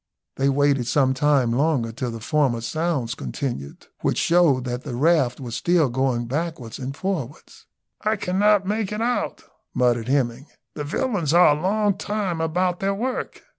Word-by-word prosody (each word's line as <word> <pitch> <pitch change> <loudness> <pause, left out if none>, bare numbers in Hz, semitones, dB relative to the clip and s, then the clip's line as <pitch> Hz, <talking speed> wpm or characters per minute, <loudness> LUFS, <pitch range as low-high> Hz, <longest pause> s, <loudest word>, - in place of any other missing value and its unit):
They 135 +1 +2
waited 140 -3 +2
some 130 0 +2
time 135 -3 +2
longer 130 -3 +1
till 125 +2 -4
the 115 -1 -6
former 125 -1 +1
sounds 135 0 -1
continued, 120 - -5
which - - 0
showed 165 -7 +3
that 125 0 -4
the 130 -5 -5
raft 140 -3 +2
was 120 -3 -6
still 170 -3 +2
going 125 -1 0
backwards 140 -3 -4
and 135 +1 -5
forwards. 160 -8 -5 0.3
"I 215 +1 +1
cannot 200 +1 +2
make 210 0 -1
it 210 +1 -3
out," 245 +1 -1 0.3
muttered 120 -2 +2
Hemming; 130 0 0 0.3
"the 150 - -5
villains 170 - -1
are 175 -4 +6
a 150 - -6
long 205 +2 +1
time 200 -6 -2
about 180 +2 0
their 195 0 0
work. 250 +5 -4
145 Hz, 165 wpm, -23 LUFS, 125-180 Hz, 0.3 s, are